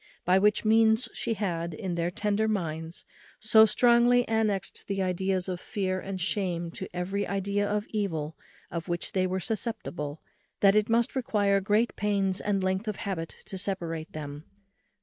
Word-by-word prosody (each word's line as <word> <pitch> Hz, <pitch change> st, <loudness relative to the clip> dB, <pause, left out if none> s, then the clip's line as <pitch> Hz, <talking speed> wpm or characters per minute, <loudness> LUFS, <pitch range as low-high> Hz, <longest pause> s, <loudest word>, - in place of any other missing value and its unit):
By 185 Hz, +2 st, +5 dB
which 210 Hz, +2 st, +2 dB
means 225 Hz, +2 st, +4 dB
she 230 Hz, -1 st, -2 dB
had, 170 Hz, -5 st, -2 dB
in 180 Hz, +2 st, -4 dB
their 170 Hz, 0 st, 0 dB
tender 210 Hz, +2 st, 0 dB
minds, 165 Hz, -5 st, -3 dB, 0.3 s
so 220 Hz, 0 st, +7 dB
strongly 240 Hz, +2 st, +4 dB
annexed 215 Hz, -4 st, -1 dB
the 195 Hz, -1 st, -2 dB
ideas 185 Hz, 0 st, 0 dB
of 180 Hz, -1 st, -4 dB
fear 185 Hz, -2 st, -2 dB
and 190 Hz, 0 st, -5 dB
shame 175 Hz, -3 st, -1 dB
to -, -, -6 dB
every 190 Hz, +3 st, -2 dB
idea 200 Hz, +1 st, -1 dB
of 210 Hz, 0 st, -1 dB
evil 165 Hz, -8 st, -2 dB, 0.4 s
of 170 Hz, 0 st, -4 dB
which 175 Hz, -1 st, -2 dB
they 185 Hz, -1 st, +1 dB
were 185 Hz, +1 st, -1 dB
susceptible, 195 Hz, -9 st, -3 dB, 0.4 s
that 195 Hz, -1 st, +6 dB
it 215 Hz, +2 st, +2 dB
must 230 Hz, +2 st, +2 dB
require 205 Hz, -6 st, +2 dB
great 210 Hz, +4 st, +1 dB
pains 200 Hz, -2 st, 0 dB
and 200 Hz, -2 st, 0 dB
length 190 Hz, +3 st, -1 dB
of 210 Hz, -, -1 dB
habit 175 Hz, -5 st, -4 dB
to 190 Hz, -, -6 dB
separate 170 Hz, -5 st, -3 dB
them. 145 Hz, 0 st, -7 dB
195 Hz, 165 wpm, -28 LUFS, 175-215 Hz, 0.4 s, so